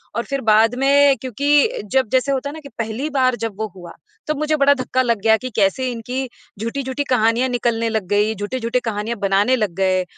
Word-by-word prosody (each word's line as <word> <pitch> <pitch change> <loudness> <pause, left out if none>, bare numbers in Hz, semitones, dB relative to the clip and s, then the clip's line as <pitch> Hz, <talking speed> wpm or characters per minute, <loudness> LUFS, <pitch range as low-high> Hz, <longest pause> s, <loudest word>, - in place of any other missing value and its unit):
और 235 - -1
फिर 275 -1 -2
बाद 225 +3 +4
में 280 0 +4
क्योंकि 280 +2 +1
जब 260 -4 +2
जैसे 260 +2 +2
होता 275 +1 -2
है - - -8
ना 315 - -8
कि 280 - -10
पहली 230 +6 -3
बार 255 -3 +1
जब 210 -4 -6
वो 220 - -1
हुआ, 175 -2 -11 0.3
तब 305 -1 -1
मुझे 305 0 +1
बड़ा 285 -1 +4
धक्का 255 -1 -1
लग 235 -4 0
गया 220 +1 +4
कि 255 +2 -6
कैसे 225 +5 +1
इनकी 250 +3 -4 0.3
झूठी-झूठी 260 +5 -3
कहानियाँ 240 +1 +2
निकलने 235 -2 0
लग 220 -4 -2
गई, 205 +2 +1
झूठे-झूठे 230 +4 -2
कहानियाँ 225 0 -3
बनाने 200 +5 +2
लग 210 -7 -1
गए 185 -1 +1
245 Hz, 205 wpm, -20 LUFS, 220-265 Hz, 0.3 s, बाद